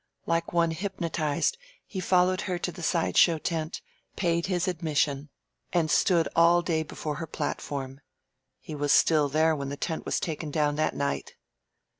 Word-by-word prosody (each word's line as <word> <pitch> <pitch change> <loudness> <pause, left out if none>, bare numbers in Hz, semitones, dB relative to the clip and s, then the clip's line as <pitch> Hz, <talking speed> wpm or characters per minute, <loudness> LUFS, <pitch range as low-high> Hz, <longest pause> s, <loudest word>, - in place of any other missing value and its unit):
Like 165 0 0
one 170 -1 +2
hypnotized 170 - -1 0.3
he 190 - -6
followed 185 0 +2
her 180 - 0
to 180 - -3
the 175 - -10
side 165 +1 0
show 170 -2 +6
tent, 160 +1 -3 0.3
paid 170 -1 0
his 180 -1 0
admission, 150 -4 -1 0.4
and 165 -3 +2
stood 170 -4 +3
all 170 +1 +5
day 165 -2 0
before 150 -1 -5
her 165 - -5
platform. 140 -2 -4 0.6
He - - -9
was 145 -1 0
still 150 -3 +4
there 155 +2 +3
when 140 -2 -4
the 140 - -5
tent 160 +1 -3
was - - -1
taken 155 -1 -4
down 145 0 +1
that 155 - 0
night. 140 0 -3
160 Hz, 165 wpm, -27 LUFS, 150-175 Hz, 0.6 s, show